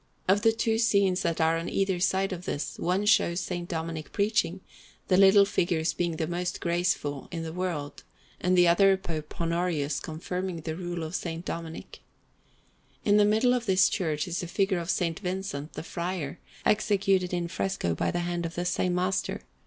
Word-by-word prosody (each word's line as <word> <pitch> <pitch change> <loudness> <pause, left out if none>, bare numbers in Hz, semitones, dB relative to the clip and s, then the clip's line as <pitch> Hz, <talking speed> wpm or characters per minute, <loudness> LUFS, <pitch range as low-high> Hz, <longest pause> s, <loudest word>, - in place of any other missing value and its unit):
Of 195 +2 +4
the 225 0 +5
two 225 0 0
scenes 200 -5 +3
that 170 -1 -1
are 165 0 +3
on 165 - -4
either 195 -2 0
side 190 +1 +1
of 180 0 -7
this, 145 - -4
one 185 +4 0
shows 195 -4 +2
S. 175 - -2
Dominic 165 -2 -4
preaching, 200 -4 0 0.5
the 185 - +5
little 195 +1 +7
figures 170 -5 0
being 170 -2 -1
the 160 - -1
most 175 +2 -3
graceful 170 -5 -1
in 165 -2 -4
the 160 -1 -5
world, 170 -5 -3 0.4
and 180 0 +2
the 175 -1 +6
other 195 +3 +5
Pope 160 -5 -6
Honorius 165 -4 0
confirming 180 +3 -4
the 160 0 -4
Rule 175 -1 -4
of 160 +1 -6
S. 165 -1 -4
Dominic. 165 -1 -6 1.1
In 205 0 +5
the 210 - +6
middle 220 +4 +3
of 240 -2 -1
this 190 0 +5
church 160 -7 -1
is 175 0 -2
a 175 - -5
figure 195 +1 +1
of 170 - -5
S. 170 - +1 0.2
Vincent, 180 -6 -4
the - - -6
Friar, 170 -4 -4 0.3
executed 195 -3 +2
in 175 -1 -1
fresco 95 - -1
by - - -1
the 175 - -1
hand 175 0 -2
of 165 - -10
the 175 - -2
same 180 0 0
master. 185 +1 -1
175 Hz, 185 wpm, -28 LUFS, 165-190 Hz, 1.1 s, little